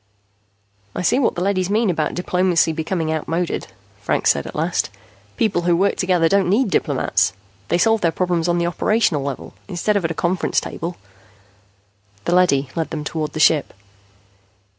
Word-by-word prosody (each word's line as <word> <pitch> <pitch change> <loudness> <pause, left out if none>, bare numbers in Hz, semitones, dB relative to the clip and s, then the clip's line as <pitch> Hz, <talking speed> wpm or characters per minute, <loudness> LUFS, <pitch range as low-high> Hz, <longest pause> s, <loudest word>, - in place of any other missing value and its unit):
"I - - -2
see 245 +8 +3
what 260 - +1
the 175 - -2
leadys 185 -2 0
mean 215 -1 +2
about 155 -3 -2
diplomacy 180 -2 +2
becoming 160 0 -2
outmoded," 165 +3 -2 0.3
Franks - - +2
said - - -3
at - - -9
last. - - 0 0.5
"People 220 -7 +1
who 170 0 +2
work 200 +3 +2
together 180 -3 +2
don't 195 0 +2
need 210 +1 +2
diplomats. 90 - +1 0.3
They 170 - +1
solve 225 +4 +3
their 170 - +2
problems 175 -1 0
on 175 0 +1
the 170 - 0
operational 175 -2 +1
level 140 -1 -5
instead 205 +2 -1
of 200 - +1
at 165 - 0
a 165 - -4
conference 175 +3 0
table." 170 +2 -6 1.3
The 175 - +1
leady 145 -7 +3
led 165 -1 -2
them 155 -2 -4
toward 155 0 -3
the 155 - -4
ship. 155 -2 +3
175 Hz, 170 wpm, -20 LUFS, 160-190 Hz, 1.3 s, see